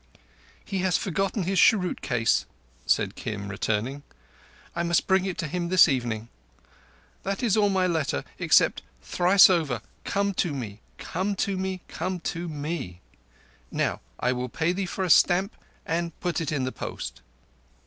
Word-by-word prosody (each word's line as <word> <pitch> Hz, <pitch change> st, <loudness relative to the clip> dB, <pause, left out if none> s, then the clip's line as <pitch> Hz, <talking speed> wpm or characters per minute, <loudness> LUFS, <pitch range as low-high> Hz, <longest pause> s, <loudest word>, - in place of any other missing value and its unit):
"He 195 Hz, -, -3 dB
has 185 Hz, -1 st, +2 dB
forgotten 195 Hz, +2 st, -1 dB
his 190 Hz, +2 st, +1 dB
cheroot 185 Hz, -5 st, +4 dB
case," 115 Hz, -3 st, +1 dB, 0.4 s
said -, -, +2 dB
Kim, 100 Hz, -2 st, -5 dB
returning. 110 Hz, +7 st, -2 dB, 0.7 s
"I 170 Hz, -, 0 dB
must 170 Hz, 0 st, +2 dB
bring 190 Hz, 0 st, +3 dB
it 190 Hz, -2 st, -3 dB
to 165 Hz, -, -2 dB
him 170 Hz, +2 st, -3 dB
this 185 Hz, -1 st, +7 dB
evening. 120 Hz, -6 st, -1 dB, 0.9 s
That 195 Hz, +4 st, -3 dB
is 225 Hz, -4 st, +3 dB
all 210 Hz, -2 st, +3 dB
my 190 Hz, -1 st, +2 dB
letter 155 Hz, -, 0 dB, 0.2 s
except, -, -, +4 dB, 0.2 s
thrice 180 Hz, -, +6 dB
over, 155 Hz, -, +1 dB, 0.2 s
Come 200 Hz, 0 st, 0 dB
to 160 Hz, -5 st, -2 dB
me! 110 Hz, -6 st, -6 dB, 0.2 s
Come 190 Hz, +4 st, -2 dB
to 200 Hz, -, -2 dB
me! 190 Hz, -1 st, -3 dB
Come 185 Hz, +2 st, -3 dB
to 170 Hz, 0 st, -5 dB
me! 145 Hz, -, -5 dB, 0.7 s
Now -, -, -1 dB, 0.2 s
I 125 Hz, -, +1 dB
will 125 Hz, 0 st, -3 dB
pay 160 Hz, +7 st, 0 dB
for 190 Hz, -, -3 dB
a 185 Hz, -, -1 dB
stamp 190 Hz, +4 st, +4 dB, 0.3 s
and 170 Hz, 0 st, -2 dB
put 175 Hz, -1 st, -1 dB
it 155 Hz, -, -2 dB
in 140 Hz, -4 st, 0 dB
the 130 Hz, -, -1 dB
post. -, -, -6 dB
170 Hz, 160 wpm, -26 LUFS, 130-190 Hz, 0.9 s, this